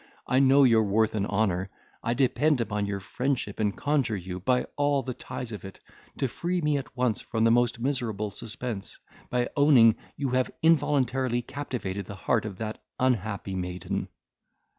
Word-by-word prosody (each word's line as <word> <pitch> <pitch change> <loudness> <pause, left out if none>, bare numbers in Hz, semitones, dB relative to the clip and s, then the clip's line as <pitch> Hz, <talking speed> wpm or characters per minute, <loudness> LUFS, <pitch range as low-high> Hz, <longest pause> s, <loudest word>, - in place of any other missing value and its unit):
I 130 - +2
know 135 +1 +6
your 115 -4 +6
worth 110 +1 +2
and 105 -2 -1
honour. 95 -2 0 0.3
I 115 - -1
depend 140 +2 +2
upon 105 -3 -1
your 100 -1 -2
friendship, 120 +2 -2
and 105 -2 0
conjure 140 -6 +1
you, 90 0 -6
by 125 +7 +1
all 145 -1 +2
the 130 - -4
ties 120 0 -6
of 105 - -7
it, 95 0 -10 0.4
to 135 - +1
free 175 +8 -2
me 150 -3 +1
at 135 -2 -7
once 125 -4 +1
from 110 -1 -1
the 115 - +5
most 120 0 +3
miserable 115 -5 -2
suspense, 110 -1 -6 0.3
by 125 -1 0
owning 135 -7 +6 0.2
you 140 -1 -1
have 130 0 +1
involuntarily 135 -6 +2
captivated 110 -9 -4
the 100 - -7
heart 110 +3 0
of 100 -3 -6
that 110 +1 -5 0.2
unhappy 110 -6 0
maiden." 90 -1 -3
120 Hz, 170 wpm, -27 LUFS, 105-135 Hz, 0.4 s, know